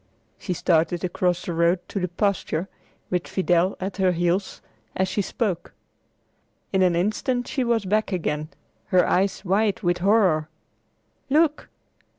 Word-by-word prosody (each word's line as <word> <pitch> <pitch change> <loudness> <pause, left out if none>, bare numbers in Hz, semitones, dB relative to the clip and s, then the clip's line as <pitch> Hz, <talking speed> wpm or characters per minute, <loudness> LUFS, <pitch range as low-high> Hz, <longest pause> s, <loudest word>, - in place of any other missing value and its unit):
She 185 - -3
started 170 0 +1
across 180 0 0
the 175 - -3
road 170 +2 +3
to 200 - -3
the 180 - -1
pasture, 185 -2 -1 0.4
with 180 -1 -1
Fidel 180 0 +1
at 190 +2 -4
her 185 -2 +2
heels, 175 +3 -1 0.4
as 190 - +1
she 195 +2 -1
spoke. 195 -2 -3 1.0
In 190 - +3
an 180 -2 +3
instant 215 +7 0
she 270 -4 -1
was 235 -3 +1
back 215 +3 0
again, 155 -4 -2 0.4
her 180 -1 +3
eyes 195 +2 +1
wide 200 +2 +1
with 175 -1 +1
horror. 185 -6 +3 0.8
"Look! 305 +1 +2
185 Hz, 145 wpm, -24 LUFS, 175-205 Hz, 1.0 s, road